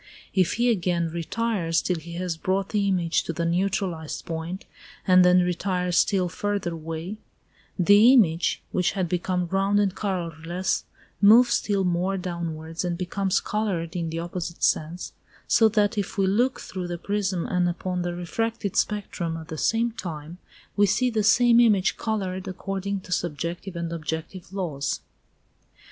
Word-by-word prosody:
If 185 -2 +2
he 240 +1 +2
again 175 -5 0
retires 170 0 -1
till 180 - -1
he 170 +2 -10
has 175 -1 -2
brought 190 +4 -1
the 205 -2 +1
image 175 -4 +1
to 165 - -3
the 170 +1 -2
neutralized 175 -2 -1
point, 165 +3 -5 0.4
and 185 -1 +6
then 180 0 +6
retires 180 0 -1
still 190 -1 +3
farther 200 -1 -2
away, 165 +5 -5 0.6
the 205 +6 +7
image, 175 -9 +3
which 180 - +1
had 190 -3 -1
become 180 +1 -1
round 195 +1 +2
and 200 -2 +2
colourless, 175 -2 -2 0.4
moves 230 +4 +7
still 200 -2 +1
more 180 +2 0
downwards 170 -2 -4
and 175 -1 -2
becomes 190 +1 0
coloured 185 -6 -2
in 170 -2 -2
the 165 - -4
opposite 170 0 -5
sense, 165 +3 0 0.3
so 225 -1 +5
that 210 0 +1
if 200 - -4
we 195 - +3
look 240 +7 +1
through 185 -2 -5
the 175 0 -4
prism 190 -1 -1
and 180 -1 +1
upon 180 +1 -3
the 175 0 -3
refracted 205 +4 -3
spectrum 185 -5 -1
at 160 0 -10
the 160 - -4
same 230 +1 +1
time, 170 -5 -7 0.4
we 205 0 +4
see 250 +5 +2
the 220 -1 +1
same 235 +3 +5
image 210 -5 +4
coloured 190 -4 -3
according 195 +1 -3
to 180 - -13
subjective 175 +2 -3
and 170 0 -3
objective 165 +2 -5
laws. 165 -8 -3
180 Hz, 155 wpm, -25 LUFS, 170-200 Hz, 0.6 s, the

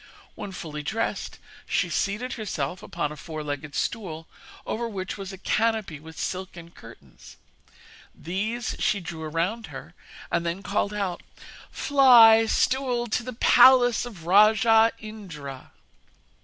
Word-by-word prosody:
When 200 - -7
fully 155 -5 -7
dressed, 220 +10 -3 0.3
she - - 0
seated 210 +6 -2
herself 180 - -4
upon 150 - -4
a - - -7
four 155 +1 -7
legged 145 0 -6
stool 165 -8 -3 0.4
over 235 +1 -3
which 190 -3 -5
was 195 -1 -7
a 190 - -9
canopy 215 -5 -1
with 160 +1 -13
silken 180 -2 -6
curtains, 95 - -15 0.8
these 215 +8 -3
she 210 -2 +1
drew 170 -2 -8
around 170 +9 -2
her, - - -10 0.4
and - - 0
then 170 +3 -4
called 200 +1 -1
out: 200 -4 -3 0.5
'Fly, 235 -6 +6
stool, 250 0 +1
to 230 - 0
the 250 +1 -7
palace 245 +1 +5
of 205 -10 -10
rajah 220 +4 +5
Indra.' 165 -12 -9
200 Hz, 130 wpm, -25 LUFS, 165-225 Hz, 0.8 s, Fly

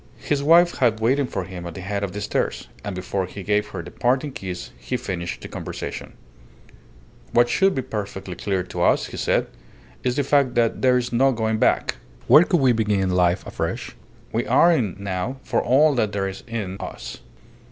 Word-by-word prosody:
His 145 -1 -1
wife 170 +4 +5
had 115 -4 +3
waited 130 +4 +1
for 95 - -3
him 90 -1 -7
at 85 - -8
the 95 - -6
head 100 +2 -3
of 100 - -2
the 105 - -5
stairs, - - -2 0.2
and 100 -2 -4
before 95 +1 -2
he 100 +1 -8
gave 105 +2 +1
her 90 -3 -6
the 90 - -10
parting 130 +4 0
kiss 95 -7 -6
he - - -3
finished 85 -2 -4
the - - -7
conversation - - -6 1.2
"What 120 0 +4
should 195 +6 +3
be 130 - -1
perfectly 100 -4 -5
clear 95 +1 -1
to - - -6
us," - - +3
he - - -8
said, - - +1 0.6
"is 125 -1 0
the 145 - +1
fact 140 -2 +2
that 115 -1 +1
there 125 -1 +4
is 125 0 -2
no 135 +3 +4
going 110 -2 -1
back. - - +2 0.3
Where 155 - +8
could 175 -4 +2
we 130 -2 +5
begin 105 -5 +1
life 90 0 +2
afresh? - - -4 0.4
We - - -1
are 175 - +5
in 115 - +1
now 100 +5 -3
for - - 0
all 145 +5 +4
that 110 -6 0
there 100 -1 -1
is 95 0 -7
in 105 -5 -4
us." - - -7
110 Hz, 200 wpm, -23 LUFS, 95-130 Hz, 1.2 s, Where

